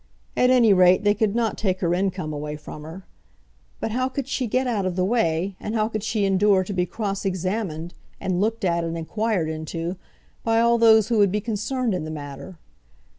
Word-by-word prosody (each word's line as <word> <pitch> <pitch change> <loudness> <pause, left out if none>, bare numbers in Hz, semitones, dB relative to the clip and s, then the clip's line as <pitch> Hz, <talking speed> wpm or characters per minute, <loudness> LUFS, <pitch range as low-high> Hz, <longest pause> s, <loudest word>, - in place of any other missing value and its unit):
At 250 - +3
any 240 -5 +5
rate, 185 +1 +5
they 205 0 +4
could 210 0 0
not 230 -2 0
take 190 -3 0
her 170 -2 +1
income 185 -4 -1
away 150 0 -4
from 150 0 -9
her. 165 +5 -10 0.7
But 225 - -3
how 255 +3 0
could 265 0 -4
she 260 -3 -1
get 255 +4 0
out 225 -5 0
of 180 - -3
the 185 0 +1
way, 190 -4 0
and 215 - -4
how 215 0 +1
could 215 -2 -3
she 215 -1 0
endure 195 0 +3
to 200 - -5
be 180 -1 0
cross 200 -3 -3
examined, 185 -3 -3 0.3
and 185 -1 -1
looked 225 0 0
at, 170 -1 +1
and 165 0 -3
inquired 205 +1 -1
into, 165 +3 -4 0.5
by 225 0 +2
all 235 0 +3
those 220 -1 +6
who 230 -3 +2
would 200 -2 +4
be 210 - 0
concerned 225 +2 -2
in 180 - -2
the 155 - -5
matter? 145 +3 -8
195 Hz, 210 wpm, -23 LUFS, 175-225 Hz, 0.7 s, those